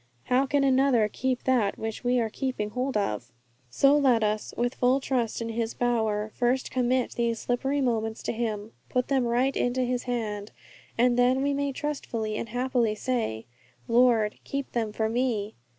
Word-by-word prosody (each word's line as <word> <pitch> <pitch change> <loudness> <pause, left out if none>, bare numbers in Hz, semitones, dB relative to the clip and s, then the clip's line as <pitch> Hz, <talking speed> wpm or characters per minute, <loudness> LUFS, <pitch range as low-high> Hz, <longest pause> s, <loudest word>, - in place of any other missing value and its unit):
How 260 +2 +2
can 285 +1 +2
another 265 -4 +4
keep 255 +3 -2
that 240 -6 +2
which 220 +1 -5
we 245 0 +2
are 225 -2 -1
keeping 250 -6 -3
hold 255 +1 -1
of? 120 - -2 0.4
So 275 - +4
let 255 -6 +4
us, 215 0 -1
with 240 +1 0
full 255 +2 +2
trust 240 -4 -1
in 230 - -4
His 225 0 -2
power, 220 -3 0
first 250 +2 0
commit 255 0 +1
these 235 -1 -1
slippery 270 +5 -1
moments 225 -3 -1
to - - -1
Him, 220 -2 -3 0.2
put 250 -1 0
them 265 -3 +2
right 250 +3 +1
into 245 +1 0
His 250 0 -1
hand, 215 -4 -3 0.5
and 245 +1 +3
then 255 +2 +3
we 285 0 +1
may 280 0 -1
trustfully 250 -7 -3
and 230 - -4
happily 245 -2 0
say, 220 - -2 0.4
'Lord, 230 -3 +3
keep 280 0 -4
them 225 -3 -1
for 220 +1 -1
me! 225 -3 -1
245 Hz, 175 wpm, -27 LUFS, 220-260 Hz, 0.5 s, another